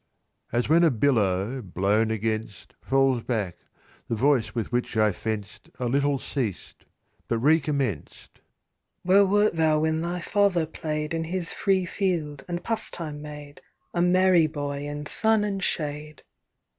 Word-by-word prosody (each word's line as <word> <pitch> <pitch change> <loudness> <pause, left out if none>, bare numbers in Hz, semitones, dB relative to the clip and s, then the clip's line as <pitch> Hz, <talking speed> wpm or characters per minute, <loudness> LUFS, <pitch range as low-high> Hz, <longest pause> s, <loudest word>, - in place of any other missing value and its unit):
As 120 +1 0
when 165 +3 +4
a 165 - +6
billow, 115 -3 +1
blown 100 +3 0
against, 110 -4 -3
Falls 135 -2 +2
back, 105 -8 -3 0.5
the 115 - -1
voice 130 0 +1
with 115 -1 -3
which 120 -2 -1
I 110 -1 +4
fenced 105 +1 -6
A 125 - -3
little 140 +3 +1
ceased, 125 -7 -5 0.4
but 115 - 0
recommenced. 140 - -1 0.6
"Where 195 +2 +5
wert 205 +1 +3
thou 160 -2 +2
when 160 0 0
thy 175 +1 -3
father 190 -2 +1
play'd 155 -1 -4
In 165 0 -2
his 175 0 -3
free 190 -2 +1
field, 165 -7 -2
and 175 -1 -4
pastime 165 -9 0
made, 150 -1 -10 0.3
A 175 - 0
merry 180 -2 +4
boy 145 -1 -4
in 145 0 -5
sun 220 +6 +3
and 195 -2 -2
shade? 150 -1 -3
145 Hz, 145 wpm, -25 LUFS, 120-170 Hz, 0.6 s, a